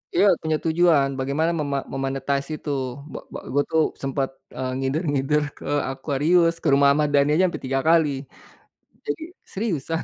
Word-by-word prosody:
Iya 190 - +5 0.2
punya 160 -1 0
tujuan 160 -4 +3
bagaimana 145 +5 0
mema 140 -2 -1
me-monetize 135 +1 -2
itu 150 - -7 0.4
bak - - -7
bak - - -7
gue 145 - +3
tuh 160 -1 +4 0.2
sempet, 135 0 -1 0.3
eee, 130 0 -3
ngider-ngider 145 +1 0
ke - - -11 0.3
Aquarius, 155 +5 +2
ke - - 0
rumah 140 0 +5
Ahmad 150 0 +2
Dhani 140 0 +4
aja 185 - +4
ampe 175 - -4
3 135 +1 0
kali, 165 -2 +5 1.0
jadi 425 -7 -3 0.3
seriusan. 165 - -2
150 Hz, 155 wpm, -23 LUFS, 135-165 Hz, 1.0 s, Iya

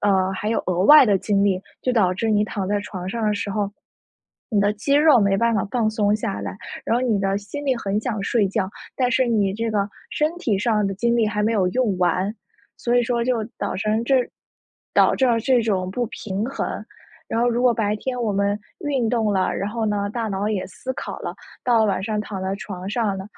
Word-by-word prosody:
呃， 190 -2 +2
还 200 +2 -3
有 225 - 0
额 180 -1 0
外 300 +4 +9
的 200 -5 +3
精 200 0 +1
力， 190 -2 +1 0.2
就 255 - +1
导 190 -6 +3
致 220 +4 -1
你 210 -1 +3
躺 205 -2 -3
在 205 +1 0
床 185 -3 -7
上 230 +4 -3
的 210 - +2
时 205 -1 -3
候， 200 0 -1 0.8
你 215 - +1
的 205 +1 +3
肌 220 +7 0
肉 295 -4 +6
没 200 -1 +3
办 235 +2 +2
法 200 - +1
放 230 -3 +1
松 210 -1 +2
下 105 - -3
来， 100 -2 -5 0.3
然 - - +2
后 245 - 0
你 215 -4 +2
的 195 0 +1
心 210 +9 -6
里 260 -2 +2
很 205 -2 -1
想 220 -3 -3
睡 205 0 +1
觉， 190 -1 -1 0.3
但 250 -2 +1
是 255 +1 +2
你 210 -5 +1
这 225 +3 -2
个 205 -2 +1 0.2
身 305 +1 0
体 230 - 0
上 210 -1 +1
的 195 - -2
精 235 +5 +1
力 230 -2 +3
还 210 0 -1
没 220 +2 +2
有 190 -5 +2
用 220 -3 0
完。 185 +3 +1 0.4
所 240 0 +1
以 245 - +4
说 235 0 0
就 235 -2 0
导 - - -2
成 215 +3 0
这 265 +3 +3 0.8
导致了 245 -3 +4
这 245 +1 +2
种 190 -4 0
不 245 +4 -1
平 210 -2 -4
衡， 275 - -3 0.6
然 225 - 0
后 240 - +3
如 240 +1 0
果 250 - +5
白 210 -2 0
天 250 +4 -3
我 225 -3 0
们 200 +1 +1 0.3
运 270 -6 0
动 220 -3 +1
了， 190 -1 +1
然 195 - -2
后 225 0 -2
呢， 205 -1 -1
大 230 +1 -2
脑 200 0 -1
也 205 -4 -2
思 260 +6 -6
考 - - -6
了， - - -4 0.3
到 240 -2 +3
了 220 - +4
晚 190 -2 0
上 210 +1 -1
躺 200 -3 -5
在 190 +1 -2
床 190 -1 -7
上 210 -3 0
呢， 190 - -6
210 Hz, 255 characters per minute, -22 LUFS, 195-235 Hz, 0.8 s, 外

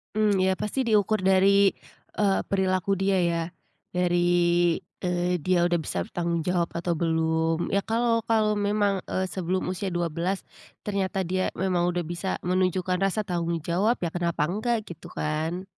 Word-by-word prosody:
Mmm, 205 -3 +3
ya, 190 0 +1
pasti 260 +5 -1
diukur 215 -3 +2
dari, 195 +1 +5 0.5
eee, 200 -2 +3
perilaku 190 0 0
dia 195 0 +2
ya. 170 -1 +1 0.5
Dari, 175 -1 +3 0.2
eee, 180 -1 0
dia 180 +1 +2
udah 175 -1 +2
bisa 90 - -3
bertanggung 170 - -2
jawab 175 -1 +1
atau 170 +1 -1
belum. 160 0 0
Ya 200 - +3
kalau, 230 +2 +1
kalau 215 -2 +3
memang, 205 -1 +1
eee, 185 - -1
sebelum 185 0 -1
usia 190 +1 -3
12, 175 +2 -2 0.4
ternyata 195 -2 -1
dia 185 +2 -1
memang 180 -1 +1
udah 175 0 -1
bisa 175 +3 -3
menunjukkan 185 0 0
rasa 195 +2 0
tanggung 170 -3 -2
jawab, 195 +8 +1
ya 165 - -1
kenapa 170 -3 -1
enggak, 220 +2 -1
gitu 170 -4 -10
kan. 160 +4 -3
185 Hz, 150 wpm, -26 LUFS, 170-195 Hz, 0.5 s, dari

